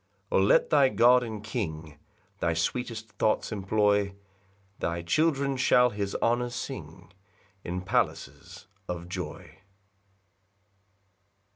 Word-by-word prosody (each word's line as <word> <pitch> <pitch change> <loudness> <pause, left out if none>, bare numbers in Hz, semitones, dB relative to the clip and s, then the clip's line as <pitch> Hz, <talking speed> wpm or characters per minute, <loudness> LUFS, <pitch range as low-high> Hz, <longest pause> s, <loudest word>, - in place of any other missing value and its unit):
8 - - 0
O - - +5
let 95 +1 +3
thy 140 -3 +5
God 125 0 +5
and 110 -3 -6
King 80 - -5 0.4
Thy 85 -1 0
sweetest 110 +5 -3
thoughts 110 - +1
employ; 100 -1 +1 0.6
Thy 85 0 -2
children 140 - +1
shall 125 -1 +4
his 100 -1 -3
honours 120 +1 +1
sing - - -8 0.5
In 90 +1 -4
palaces 85 0 -2 0.2
of 85 -1 -5
joy. 90 -2 -7
105 Hz, 110 wpm, -28 LUFS, 90-120 Hz, 0.6 s, O